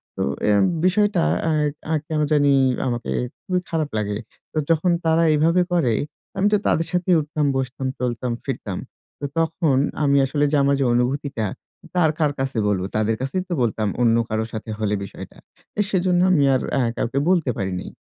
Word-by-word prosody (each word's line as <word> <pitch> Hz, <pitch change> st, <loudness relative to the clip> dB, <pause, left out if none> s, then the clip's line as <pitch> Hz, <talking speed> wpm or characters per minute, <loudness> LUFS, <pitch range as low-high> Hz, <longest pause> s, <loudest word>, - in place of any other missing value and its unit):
তো -, -, -4 dB, 0.3 s
এম 100 Hz, -1 st, +4 dB, 0.2 s
বিষয়টা 205 Hz, +3 st, +3 dB, 0.3 s
আ -, -, +2 dB, 0.4 s
আ -, -, +2 dB
কেনো 155 Hz, -1 st, 0 dB
জানি 145 Hz, -1 st, +4 dB, 0.4 s
আমাকে 120 Hz, -1 st, -3 dB, 0.3 s
খুবই 185 Hz, -1 st, 0 dB
খারাপ 155 Hz, -3 st, -1 dB
লাগে। 105 Hz, -1 st, -1 dB, 0.3 s
তো -, -, -7 dB
যখন 165 Hz, +2 st, +3 dB
তারা 165 Hz, +1 st, +3 dB
এভাবে 165 Hz, +4 st, +3 dB
করে 130 Hz, -10 st, +2 dB, 0.4 s
আমি 195 Hz, -, +3 dB
তো -, -, +6 dB
তাদের 165 Hz, 0 st, +1 dB
সাথেই 180 Hz, 0 st, +2 dB
উঠতাম, 150 Hz, 0 st, -2 dB
বসতাম, 130 Hz, 0 st, -3 dB
চলতাম, 125 Hz, 0 st, -2 dB
ফিরতাম। 115 Hz, -8 st, -4 dB, 0.4 s
তো -, -, -4 dB
তখন 165 Hz, -3 st, +1 dB, 0.3 s
আমি 140 Hz, -1 st, +4 dB
আসলে 145 Hz, +2 st, +1 dB
যে 150 Hz, -, +2 dB
আমার 140 Hz, 0 st, +3 dB
যে 135 Hz, -, +2 dB
অনুভূতিটা 125 Hz, -1 st, 0 dB, 0.5 s
তা -, -, -4 dB
আর 155 Hz, -, +3 dB
কার 150 Hz, -2 st, +2 dB
কাছে 135 Hz, -2 st, -2 dB
বলবো, 95 Hz, -2 st, 0 dB
তাদের 110 Hz, +1 st, +1 dB
কাছেই 135 Hz, +8 st, -1 dB
তো -, -, -1 dB
বলতাম 110 Hz, -2 st, 0 dB
অন্য 115 Hz, -1 st, +4 dB
কারো 110 Hz, 0 st, -1 dB
সাথে 110 Hz, 0 st, -6 dB
হলে 105 Hz, -1 st, 0 dB
বিষয়টা। 100 Hz, -, -10 dB, 0.4 s
এ -, -, +5 dB
সেজন্য 180 Hz, -1 st, +2 dB
আমি 145 Hz, -6 st, +4 dB
আর -, -, 0 dB, 0.2 s
আ -, -, +3 dB, 0.2 s
কাউকে 120 Hz, +4 st, 0 dB
বলতে 170 Hz, -8 st, +2 dB
পারি 95 Hz, -1 st, -2 dB
নি। -, -, -9 dB
140 Hz, 185 wpm, -22 LUFS, 120-165 Hz, 0.5 s, তো